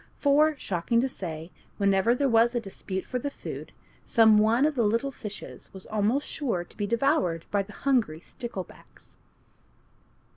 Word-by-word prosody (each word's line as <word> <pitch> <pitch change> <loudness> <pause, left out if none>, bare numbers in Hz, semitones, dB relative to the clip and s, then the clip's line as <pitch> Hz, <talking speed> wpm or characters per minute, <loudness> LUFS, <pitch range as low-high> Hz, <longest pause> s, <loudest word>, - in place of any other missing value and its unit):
For, 300 +1 +3
shocking 195 +1 0
to 265 - +1
say, 165 -8 -6 0.3
whenever 200 +3 +3
there 280 +2 +1
was 235 0 +4
a - - +2
dispute 190 -3 -5
for 250 - -3
the 285 - -3
food, - - -8 0.3
some 220 -2 +5
one 225 +6 +4
of 310 - +2
the 250 - 0
little 230 +6 +1
fishes 210 -5 -9
was 190 - -9
almost 215 +6 0
sure 235 - -2
to - - -18
be 205 - -2
devoured 235 - +1
by 205 - +2
the 200 +2 -9
hungry 235 - +1
sticklebacks. 195 -1 -9
225 Hz, 160 wpm, -27 LUFS, 195-265 Hz, 0.3 s, some